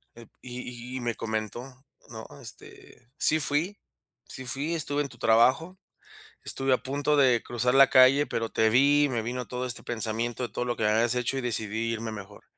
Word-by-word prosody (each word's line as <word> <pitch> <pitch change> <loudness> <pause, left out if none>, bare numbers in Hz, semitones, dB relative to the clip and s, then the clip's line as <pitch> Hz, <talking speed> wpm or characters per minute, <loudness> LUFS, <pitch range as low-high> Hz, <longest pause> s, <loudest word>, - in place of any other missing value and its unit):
eh, 115 -1 -13
y 125 0 -8
y - - -4
me 120 -2 -2
comentó, 110 +1 -4 0.5
¿no?, 110 -1 -9
este, 120 - -13
sí 155 - +3
fui 155 +8 -1 0.5
sí 130 - -8
fui, 140 +7 -2
estuve 145 -2 -1
en 140 - -4
tu 120 - -15
trabajo, 130 +12 +3 0.7
estuve 135 0 -2
a - - +5
punto 145 +2 -1
de 130 -4 +4
cruzar 120 +1 -1
la 135 0 +7
calle, 130 +3 +6
pero 115 -5 -3
te 110 0 +2
vi, 145 +4 +4
me 120 -3 -1
vino 125 +2 -5
todo 125 0 -4
este 120 -1 -6
pensamiento 115 +1 -3
de - - -4
todo 125 - -2
lo 120 -1 -2
que 110 - -2
me 105 - +3
habías 115 +3 +2
hecho, 125 +2 -1
y - - -1
decidí 115 -2 -2
irme 115 0 -4
mejor. 105 -1 -10
125 Hz, 195 wpm, -27 LUFS, 115-135 Hz, 0.7 s, la